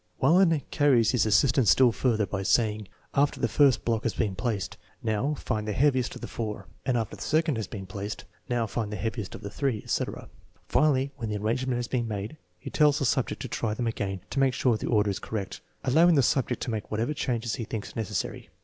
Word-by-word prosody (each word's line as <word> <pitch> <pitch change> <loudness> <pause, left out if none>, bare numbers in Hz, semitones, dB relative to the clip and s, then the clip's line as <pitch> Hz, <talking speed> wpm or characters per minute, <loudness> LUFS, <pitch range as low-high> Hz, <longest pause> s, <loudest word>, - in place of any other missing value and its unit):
Wallin 165 +1 +4
carries 135 -7 +4
his 125 -3 +2
assistance 115 +2 +4
still 130 -2 +6
further 110 -3 +1
by 95 -1 -3
saying, 105 0 +1 0.3
after 145 +1 +2
the - - +2
first 135 0 +3
block 115 -2 +1
has 115 - -2
been 105 -5 0
placed, 105 -1 -2 0.2
" - - -33
Now, 115 +7 0
find 110 -5 -3
the 105 - -1
heaviest 130 0 +2
of - - -9
the - - -5
four," 105 -3 -5 0.2
and 125 -2 +2
after 115 -3 -3
the - - -13
second 155 -3 +1
has 110 - -3
been 100 -3 -7
placed, 100 +1 -6
" - - -36
Now, 120 -2 +1
find 110 -1 -3
the - - -3
heaviest 110 -2 -4
of - - -9
the 100 - -6
three," 135 -7 -1
etc. - - -3 0.4
Finally, 140 -3 +2
when 115 -4 -4
the 105 - -2
ar 105 - -4
rangement 125 +3 0
has 120 -1 -2
been 120 -2 -1
made, 105 +6 -5 0.2
he - - -8
tells 150 -2 +4
the 140 - 0
subject 130 0 0
to - - -4
try 110 -2 -2
them 120 - -2
again 100 -5 -2
to 140 - -1
make 135 -2 +3
sure 125 -3 +2
the - - -4
order 105 -3 +2
is 95 - -4
correct, 105 -4 -5 0.2
allowing 165 +6 +5
the 140 - +4
sub 130 +1 +2
ject 125 - -2
to - - -3
make 110 -2 -4
whatever 115 +7 -1
changes 120 -5 -2
he 115 - -3
thinks 110 -1 -6
necessary. 105 -4 -3
115 Hz, 235 wpm, -27 LUFS, 105-135 Hz, 0.4 s, still